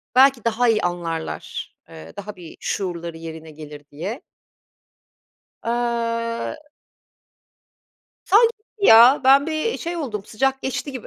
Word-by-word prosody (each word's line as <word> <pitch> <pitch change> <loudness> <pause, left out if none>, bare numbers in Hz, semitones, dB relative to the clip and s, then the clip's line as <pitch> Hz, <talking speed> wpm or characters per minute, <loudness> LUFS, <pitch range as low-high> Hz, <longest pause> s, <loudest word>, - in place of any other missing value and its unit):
belki 265 -3 +5
daha 230 +2 +1
iyi 220 -1 +2
anlarlar, 170 -2 -4
eee, 80 0 -12
daha 205 +1 -7
bir 175 -3 -12
şuurları 170 -4 -4
yerine 160 -1 -9
gelir, 150 -1 -11
diye. 190 - -6 1.4
Aaa 230 +1 -2 1.7
sanki 455 +4 +4
gitti 425 -1 -4
ya, 235 +5 +8
ben 275 +2 +6
bir 320 +8 -2
şey 345 +1 -4
oldum, 225 -11 -4
sıcak 265 +6 -1
geçti 265 +1 -4
gibi. 255 -3 -7
230 Hz, 120 wpm, -22 LUFS, 170-270 Hz, 1.7 s, ya